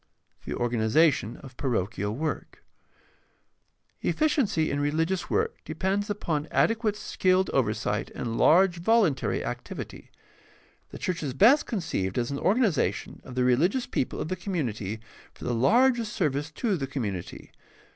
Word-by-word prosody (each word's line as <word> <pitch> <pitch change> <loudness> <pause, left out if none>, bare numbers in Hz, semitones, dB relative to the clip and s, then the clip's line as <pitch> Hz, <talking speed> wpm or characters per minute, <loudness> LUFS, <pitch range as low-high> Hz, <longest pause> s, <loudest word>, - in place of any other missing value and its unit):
The - - -3
organization 120 +2 +2
of 130 -2 -11
parochial 105 -5 -1
work. 155 +4 -4 0.7
— - - -45
Efficiency 260 - +1
in 140 - -1
reli 150 +3 +1
gious 190 +1 -3
work 450 +1 0
depends 200 +2 -1
upon 160 -7 -2
adequate 225 -2 +2
skilled 185 -2 +1
oversight 105 -4 0
and 115 -2 -3
large 175 +5 +5
voluntary 180 - +2
activity. - - -7 0.8
The - - -9
church 180 -1 -2
is 135 -4 -3
best 245 - +5
conceived 155 - -2
as 120 +2 0
an 140 - -3
organization 200 - +1
of 125 - -10
the 125 - +2
religious 165 - +2
people 130 - -2
of - - -3
the 185 - -1
community 115 - -3 0.3
for - - -12
the 125 - -1
largest 230 - +3
service 145 -3 -1
to 210 -2 0
the 135 -3 -3
community. 105 -10 -5
155 Hz, 140 wpm, -27 LUFS, 125-200 Hz, 0.8 s, large